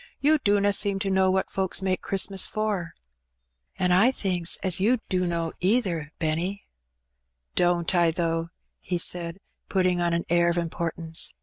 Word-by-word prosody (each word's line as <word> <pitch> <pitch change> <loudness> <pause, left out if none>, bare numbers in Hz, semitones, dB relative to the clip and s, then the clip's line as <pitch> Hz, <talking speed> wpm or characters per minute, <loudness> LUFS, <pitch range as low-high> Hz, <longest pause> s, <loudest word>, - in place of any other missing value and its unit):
"You 305 +2 +3
dunna 205 -3 +2
seem 200 -1 +2
to 195 0 -2
know 190 0 +3
what 190 0 0
folks 190 0 0
make 185 -1 0
Christmas 195 -1 +1
for.'' 210 -6 -3 0.4
" 65 +2 -52
An' 180 -1 0
I 195 +7 +5
thinks 180 -9 +1
as 185 -2 +3
you 230 +7 +3
dunno 170 -3 -1
either, 180 -7 0
Benny.'^ 170 +5 -2 0.9
"Don't 175 -1 +1
I, 170 -2 +3
though?'' 165 0 -2 0.3
he 180 - -3
said, 170 0 0 0.3
putting 185 -2 +1
on 170 -1 +1
an 170 - -2
air 170 0 +3
of 170 - -1
im 170 -1 -2
portance. 165 -1 -2
180 Hz, 165 wpm, -25 LUFS, 170-195 Hz, 0.9 s, I